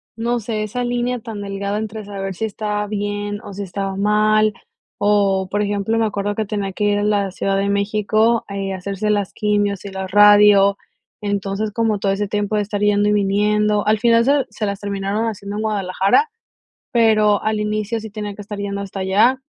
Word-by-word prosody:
no 235 Hz, +1 st, -1 dB
sé, 215 Hz, -1 st, -3 dB
esa 230 Hz, +4 st, -3 dB
línea 245 Hz, 0 st, -1 dB
tan 220 Hz, -3 st, -7 dB
delgada 200 Hz, 0 st, -3 dB
entre 220 Hz, 0 st, -5 dB
saber 195 Hz, -1 st, -5 dB
si 220 Hz, +5 st, -3 dB
estaba 210 Hz, -1 st, -3 dB
bien, 205 Hz, 0 st, -3 dB
o, 200 Hz, -, -9 dB
si 200 Hz, +1 st, -5 dB
estaba 195 Hz, +1 st, -4 dB
mal, 215 Hz, +1 st, +3 dB, 0.4 s
o, 200 Hz, -2 st, +2 dB
por 205 Hz, +1 st, -1 dB
ejemplo, 205 Hz, +2 st, -1 dB
me 225 Hz, -, +2 dB
acuerdo 205 Hz, -1 st, -2 dB
que 220 Hz, -, -1 dB
tenía 200 Hz, -1 st, -3 dB
que 210 Hz, -, -1 dB
ir 205 Hz, 0 st, +2 dB
a -, -, -1 dB
la 205 Hz, -2 st, +1 dB
Ciudad 195 Hz, +1 st, -1 dB
de 200 Hz, 0 st, 0 dB
México, 215 Hz, +3 st, +1 dB
eh, 195 Hz, -1 st, -3 dB
a -, -, -4 dB
hacerse 200 Hz, +3 st, -3 dB
las 205 Hz, -2 st, 0 dB
quimios 205 Hz, -2 st, 0 dB
y 200 Hz, -, -6 dB
la 190 Hz, 0 st, -5 dB
radio. 205 Hz, 0 st, +6 dB, 0.5 s
Entonces, 200 Hz, +1 st, -2 dB
como 220 Hz, -1 st, 0 dB
todo 195 Hz, -1 st, 0 dB
ese 205 Hz, +1 st, -1 dB
tiempo 205 Hz, +1 st, -1 dB
de 210 Hz, -, +2 dB
estar 205 Hz, 0 st, -4 dB
yendo 205 Hz, 0 st, +3 dB
y -, -, +2 dB
viniendo, 210 Hz, +1 st, +1 dB
al 215 Hz, 0 st, +2 dB
final 230 Hz, 0 st, +4 dB
se 280 Hz, 0 st, +3 dB
se 210 Hz, 0 st, -4 dB
las 200 Hz, -1 st, -3 dB
terminaron 200 Hz, +2 st, -2 dB
haciendo 200 Hz, -2 st, -5 dB
en 215 Hz, -, -2 dB
Guadalajara, 200 Hz, -, +1 dB, 0.6 s
pero 215 Hz, -3 st, +3 dB
al 215 Hz, -1 st, 0 dB
inicio 215 Hz, +1 st, -2 dB
sí 220 Hz, -1 st, -8 dB
tenía 210 Hz, -1 st, -5 dB
que 205 Hz, -, -9 dB
estar 205 Hz, 0 st, -7 dB
yendo 200 Hz, 0 st, -3 dB
hasta 195 Hz, 0 st, -6 dB
allá, 210 Hz, +8 st, +3 dB
205 Hz, 205 wpm, -20 LUFS, 200-215 Hz, 0.6 s, radio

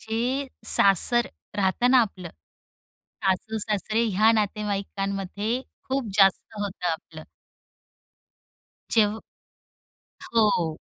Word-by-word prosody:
जे 245 Hz, +5 st, -2 dB, 0.3 s
सासर 235 Hz, +6 st, +5 dB, 0.3 s
राहतं 205 Hz, +5 st, +1 dB
ना 260 Hz, -, +6 dB
आपलं. 190 Hz, -6 st, -4 dB, 1.0 s
सासू-सासरे 215 Hz, +3 st, -1 dB
ह्या 215 Hz, +2 st, +5 dB
नातेवाईकांमध्ये 200 Hz, +1 st, -3 dB, 0.2 s
खूप 265 Hz, -3 st, -3 dB
जास्त 195 Hz, +1 st, +2 dB
होतं 195 Hz, -3 st, -5 dB
आपलं. 160 Hz, -1 st, -8 dB, 1.7 s
जेव्ह 220 Hz, -1 st, +1 dB, 1.1 s
हो. 180 Hz, -8 st, +1 dB
210 Hz, 75 wpm, -24 LUFS, 195-225 Hz, 1.7 s, ना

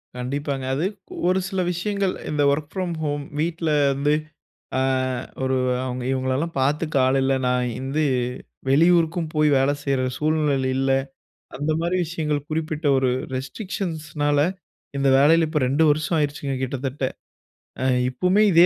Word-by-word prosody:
கண்டிப்பாங்க. 135 Hz, +1 st, -3 dB
அது, 160 Hz, +6 st, 0 dB, 0.4 s
ஒரு 185 Hz, +1 st, +3 dB
சில 190 Hz, -2 st, -2 dB
விஷயங்கள், 195 Hz, +2 st, -1 dB, 0.2 s
இந்த 150 Hz, -1 st, 0 dB
வொர்க் 145 Hz, +1 st, -2 dB
ஃப்ரம் 180 Hz, -3 st, -2 dB
ஹோம் 145 Hz, -1 st, -1 dB, 0.2 s
வீட்ல 165 Hz, 0 st, -1 dB, 0.2 s
வந்து, 145 Hz, +2 st, +1 dB, 0.7 s
அ -, -, +1 dB, 0.6 s
ஒரு 130 Hz, 0 st, +1 dB, 0.3 s
அவங்க 125 Hz, -1 st, -4 dB
இவங்களலாம் 130 Hz, +5 st, -1 dB
பாத்துக்க 150 Hz, +3 st, 0 dB
ஆள் 135 Hz, +1 st, +2 dB
இல்ல. 135 Hz, 0 st, +2 dB
நான் 125 Hz, 0 st, +1 dB
வந்து 140 Hz, +4 st, -1 dB, 0.7 s
வெளியூருக்கும் 165 Hz, +2 st, +3 dB
போய், 150 Hz, 0 st, +4 dB
வேலை 135 Hz, +2 st, +3 dB
செய்ற 135 Hz, -2 st, 0 dB
சூழ்நிலையில 150 Hz, -4 st, +1 dB
இல்ல. 135 Hz, 0 st, +1 dB, 0.7 s
அந்த 145 Hz, +3 st, -1 dB
மாரி 175 Hz, +2 st, 0 dB
விஷயங்கள் 150 Hz, -3 st, -2 dB
குறிப்பிட்ட 155 Hz, 0 st, -3 dB
ஒரு 130 Hz, -1 st, +2 dB, 0.3 s
ரெஸ்ட்ரிக்ஷன்ஸ்னால 155 Hz, 0 st, -2 dB, 0.6 s
இந்த 135 Hz, 0 st, +2 dB
வேலையில 160 Hz, +3 st, +5 dB
இப்போ 155 Hz, -2 st, 0 dB
2 145 Hz, +4 st, +2 dB
வருஷம் 155 Hz, +3 st, +1 dB
ஆயிடுச்சுங்க, 145 Hz, -2 st, -1 dB
கிட்டத்தட்ட. 135 Hz, +1 st, -3 dB, 0.8 s
அ -, -, 0 dB, 0.2 s
இப்புமே, 180 Hz, +10 st, +2 dB
இதே 170 Hz, +1 st, +7 dB
150 Hz, 135 wpm, -23 LUFS, 135-165 Hz, 0.8 s, இதே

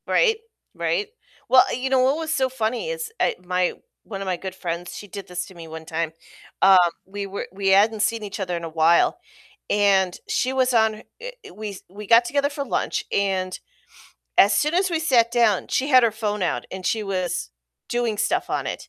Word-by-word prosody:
Right. 450 Hz, -3 st, +3 dB, 0.4 s
Right. 430 Hz, -4 st, -1 dB, 0.4 s
Well, 255 Hz, -1 st, +8 dB
you 255 Hz, +2 st, -2 dB
know 265 Hz, -1 st, +3 dB
what 265 Hz, +3 st, +3 dB
was 320 Hz, -1 st, -2 dB
so 265 Hz, -3 st, +2 dB
funny 245 Hz, -, -2 dB
is, 480 Hz, -2 st, -4 dB
eh, -, -, +2 dB
my 180 Hz, 0 st, 0 dB, 0.3 s
one 195 Hz, -3 st, -7 dB
of -, -, -4 dB
my 185 Hz, -2 st, -1 dB
good 190 Hz, +1 st, -7 dB
friends, 175 Hz, -1 st, -5 dB
she 205 Hz, -, -9 dB
did 200 Hz, +1 st, -8 dB
this 180 Hz, 0 st, -4 dB
to 190 Hz, -, -14 dB
me 165 Hz, -1 st, -10 dB
one 160 Hz, 0 st, -9 dB
time. 160 Hz, 0 st, -2 dB, 0.5 s
Um, 195 Hz, -1 st, +7 dB, 0.3 s
we 200 Hz, +1 st, -5 dB
were 195 Hz, +1 st, -5 dB
we 195 Hz, +1 st, -1 dB
hadn't 210 Hz, +3 st, +4 dB
seen 225 Hz, +1 st, 0 dB
each 205 Hz, 0 st, -6 dB
other 180 Hz, -2 st, -2 dB
in 170 Hz, -, -7 dB
a 165 Hz, -, -4 dB
while, 160 Hz, +1 st, +3 dB, 0.5 s
and 195 Hz, -3 st, +3 dB
she 255 Hz, +1 st, 0 dB
was 260 Hz, -1 st, +2 dB
on 220 Hz, -2 st, +2 dB, 0.2 s
eh, -, -, -6 dB, 0.2 s
we 215 Hz, -1 st, -6 dB
s 195 Hz, -, -11 dB
we 205 Hz, +2 st, -10 dB
got 230 Hz, +3 st, +7 dB
together 285 Hz, +2 st, 0 dB
for 285 Hz, -1 st, -5 dB
lunch, -, -, -1 dB
and 190 Hz, -2 st, -1 dB, 0.8 s
as 200 Hz, -, +6 dB
soon 300 Hz, +2 st, +1 dB
as 375 Hz, +1 st, +2 dB
we 335 Hz, -, 0 dB
sat 240 Hz, -7 st, +3 dB
down, 230 Hz, -5 st, +3 dB
she 270 Hz, -, 0 dB
had 255 Hz, -3 st, +6 dB
her 230 Hz, -2 st, +3 dB
phone 210 Hz, -2 st, -2 dB
out 175 Hz, -, -1 dB
and 190 Hz, -1 st, -6 dB
she 220 Hz, -, 0 dB
was 185 Hz, -, -2 dB, 0.4 s
doing 240 Hz, -3 st, -1 dB
stuff -, -, 0 dB
on -, -, -1 dB
it. -, -, -6 dB
210 Hz, 210 wpm, -23 LUFS, 185-255 Hz, 0.8 s, Well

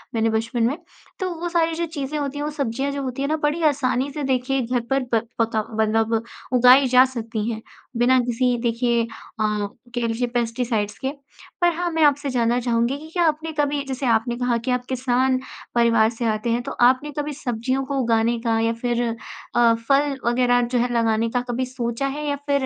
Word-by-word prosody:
मैंने 225 Hz, 0 st, +2 dB
बचपन 225 Hz, +2 st, -1 dB
में। 280 Hz, +5 st, -2 dB, 0.4 s
तो 375 Hz, -, -1 dB
वो 350 Hz, +1 st, -2 dB
सारी 330 Hz, -1 st, +1 dB
जो 340 Hz, +1 st, -1 dB
चीज़ें 300 Hz, -2 st, -4 dB
होती 285 Hz, 0 st, -3 dB
हैं, 290 Hz, -, -2 dB
वो 300 Hz, -, -1 dB
सब्ज़ियाँ 275 Hz, -1 st, -2 dB
जो 280 Hz, 0 st, -3 dB
होती 260 Hz, 0 st, -4 dB
हैं 280 Hz, -, 0 dB
ना 310 Hz, -, +2 dB
बड़ी 300 Hz, +2 st, 0 dB
आसानी 275 Hz, -3 st, +1 dB
से 295 Hz, +1 st, -4 dB
देखिए 265 Hz, 0 st, 0 dB
घर 245 Hz, +1 st, 0 dB
पर 270 Hz, 0 st, +2 dB
प 225 Hz, -, +4 dB, 0.2 s
पका 225 Hz, -1 st, +1 dB
मतलब 220 Hz, +1 st, +1 dB, 0.4 s
उगाई 250 Hz, +2 st, +7 dB
जा 255 Hz, 0 st, +7 dB
सकती 230 Hz, -3 st, -4 dB
हैं 220 Hz, -1 st, -5 dB, 0.4 s
बिना 250 Hz, +2 st, +4 dB
किसी 245 Hz, 0 st, +1 dB
देखिए 235 Hz, 0 st, +1 dB
अ, -, -, -5 dB, 0.9 s
कह 240 Hz, -1 st, 0 dB
लीजिए 230 Hz, +2 st, -1 dB
पेस्टिसाइड्स 230 Hz, -3 st, -1 dB
के। 265 Hz, -, -2 dB, 0.5 s
पर 350 Hz, 0 st, +5 dB
हाँ 350 Hz, +1 st, -1 dB
मैं 320 Hz, -1 st, +2 dB
आपसे 285 Hz, -1 st, +3 dB
जानना 240 Hz, -1 st, +1 dB
चाहूँगी 235 Hz, +2 st, 0 dB
कि 315 Hz, +1 st, -11 dB
क्या 350 Hz, -, +2 dB
आपने 315 Hz, +1 st, -1 dB
कभी 290 Hz, -1 st, +1 dB
जैसे 265 Hz, 0 st, -3 dB
आपने 235 Hz, 0 st, +2 dB
कहा 245 Hz, -1 st, +1 dB
कि 235 Hz, +2 st, -3 dB
आप 250 Hz, 0 st, -1 dB
किसान 255 Hz, 0 st, +1 dB, 0.4 s
परिवार 230 Hz, -2 st, +4 dB
से 235 Hz, +1 st, -4 dB
आते 215 Hz, +2 st, -3 dB
हैं 235 Hz, +1 st, +1 dB
तो -, -, -5 dB
आपने 255 Hz, +4 st, +3 dB
कभी 295 Hz, 0 st, -3 dB
सब्ज़ियों 260 Hz, 0 st, -2 dB
को 275 Hz, 0 st, -3 dB
उगाने 230 Hz, 0 st, +1 dB
का 230 Hz, -1 st, +1 dB
या 225 Hz, 0 st, +1 dB
फ़िर 240 Hz, +1 st, -1 dB, 0.5 s
अ, 235 Hz, -1 st, +5 dB
फल 280 Hz, 0 st, +2 dB
वगैरह 245 Hz, 0 st, +3 dB
जो 245 Hz, +1 st, 0 dB
है 245 Hz, +1 st, 0 dB
लगाने 230 Hz, -1 st, +1 dB
का 245 Hz, +2 st, 0 dB
कभी 255 Hz, +2 st, -1 dB
सोचा 250 Hz, +1 st, -3 dB
है? 295 Hz, +2 st, -4 dB
या 285 Hz, -, 0 dB
फ़िर 280 Hz, -1 st, +2 dB
250 Hz, 205 wpm, -22 LUFS, 230-275 Hz, 0.9 s, उगाई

